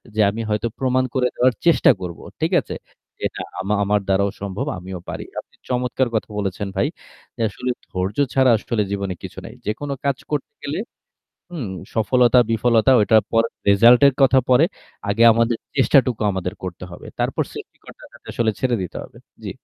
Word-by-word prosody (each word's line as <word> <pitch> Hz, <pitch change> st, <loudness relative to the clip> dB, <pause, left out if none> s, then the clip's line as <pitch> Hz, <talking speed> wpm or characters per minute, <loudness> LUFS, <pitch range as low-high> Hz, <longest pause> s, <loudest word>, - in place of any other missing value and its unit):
যে 110 Hz, -, +3 dB
আমি 110 Hz, +3 st, -4 dB
হয়তো 105 Hz, +2 st, 0 dB
প্রমাণ 130 Hz, -1 st, +1 dB
করে 125 Hz, -2 st, +2 dB
দেওয়ার 125 Hz, 0 st, +3 dB
চেষ্টা 170 Hz, -, +6 dB
করব। 90 Hz, -2 st, -6 dB, 0.2 s
ঠিক -, -, 0 dB
আছে? -, -, -7 dB, 0.4 s
যে -, -, -3 dB
না -, -, -4 dB, 0.2 s
আমা 100 Hz, +2 st, -1 dB
আমার 105 Hz, +1 st, +2 dB
দ্বারাও 100 Hz, +1 st, +2 dB
সম্ভব, 100 Hz, +6 st, -3 dB
আমিও 90 Hz, +1 st, -7 dB
পারি। -, -, -5 dB
আপনি -, -, -14 dB
চমৎকার 125 Hz, +1 st, 0 dB
কথা 110 Hz, -, -1 dB
বলেছেন, 100 Hz, 0 st, -3 dB
ভাই। 95 Hz, -, +1 dB, 0.5 s
যে -, -, -6 dB
আসলে 115 Hz, +5 st, -5 dB, 0.2 s
ধৈর্য 95 Hz, +2 st, -3 dB, 0.2 s
ছাড়া 130 Hz, -2 st, +4 dB
আসলে 110 Hz, +1 st, -2 dB
জীবনে 100 Hz, -2 st, -2 dB
কিছু -, -, -9 dB
নাই। -, -, -9 dB
যেকোনো 140 Hz, +7 st, -3 dB
কাজ 140 Hz, -2 st, +1 dB
করতে 150 Hz, -2 st, -2 dB
গেলে 145 Hz, +4 st, -3 dB, 0.7 s
হুম, 150 Hz, -, -5 dB, 0.3 s
সফলতা 120 Hz, +2 st, +4 dB
বিফলতা 115 Hz, +2 st, +3 dB
ওটার 105 Hz, +1 st, +4 dB
পরে 115 Hz, 0 st, +3 dB, 0.2 s
result 115 Hz, +5 st, +7 dB
এর 140 Hz, -, +3 dB
কথা 135 Hz, 0 st, +5 dB
পরে। 130 Hz, +5 st, +6 dB, 0.4 s
আগে 100 Hz, +3 st, +2 dB
আমাদের 115 Hz, +1 st, +1 dB, 0.2 s
চেষ্টাটুকু 130 Hz, -4 st, +3 dB
আমাদের 95 Hz, 0 st, -3 dB
করতে 90 Hz, -1 st, -6 dB
হবে। 85 Hz, -, -11 dB
তারপর -, -, 0 dB
সৃষ্টিকর্তার -, -, -12 dB
কাছে -, -, -17 dB
আসলে 115 Hz, -2 st, +1 dB
ছেড়ে 125 Hz, -2 st, +1 dB
দিতে 90 Hz, -, -6 dB
হবে। -, -, -15 dB, 0.3 s
জি। -, -, -4 dB
115 Hz, 175 wpm, -21 LUFS, 100-125 Hz, 0.7 s, result